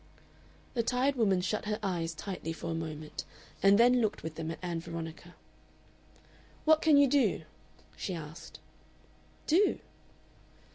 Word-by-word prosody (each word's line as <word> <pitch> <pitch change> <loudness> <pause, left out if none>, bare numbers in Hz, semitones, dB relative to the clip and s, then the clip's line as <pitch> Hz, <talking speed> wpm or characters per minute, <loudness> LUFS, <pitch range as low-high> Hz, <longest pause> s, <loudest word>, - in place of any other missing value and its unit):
The 240 - +1
tired 255 +4 +1
woman 195 -7 +2
shut 215 +4 -2
her 210 0 -1
eyes 170 -4 -1
tightly 165 -1 -5
for 165 +1 -5
a - - -1
moment, 155 -2 -5 0.4
and 195 +1 +6
then 245 +2 +5
looked 215 -2 -1
with 160 0 -4
them 160 0 -5
at 165 - -4
Ann 170 -2 -2
Veronica. 165 +1 -7 1.3
"What 315 0 +5
can 310 -3 +5
you 285 - +7
do?" 255 - +2 0.5
she 185 - -4
asked. 165 +1 -9 0.9
"Do?" 375 +6 +3
185 Hz, 140 wpm, -31 LUFS, 165-245 Hz, 1.3 s, you